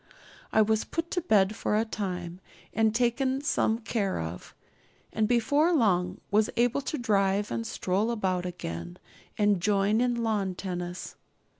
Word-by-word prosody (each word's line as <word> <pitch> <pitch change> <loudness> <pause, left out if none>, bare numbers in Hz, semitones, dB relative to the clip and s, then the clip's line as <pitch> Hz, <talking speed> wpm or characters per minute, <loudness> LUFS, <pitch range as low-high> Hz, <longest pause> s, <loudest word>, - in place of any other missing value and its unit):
I 220 - +5
was 220 0 +1
put 330 0 -4
to 360 - 0
bed 210 - +3
for 210 - 0
a 220 - +1
time 180 -5 -4 0.3
and 220 0 +2
taken 260 +3 +1
some 225 -5 +1
care 220 -4 -2
of; 80 +2 -7 0.6
and 220 -1 +1
before 285 +8 +3
long 185 - +2
was 210 +1 +3
able 245 +3 +2
to 300 - -3
drive 200 -3 +1
and 115 -1 -2
stroll 195 +5 0
about 185 -6 -1
again, 85 - -6 0.4
and 205 -3 +2
join 205 +3 +2
in 240 -1 0
lawn 205 -4 0
tennis. 180 -1 -5
210 Hz, 150 wpm, -28 LUFS, 185-235 Hz, 0.6 s, I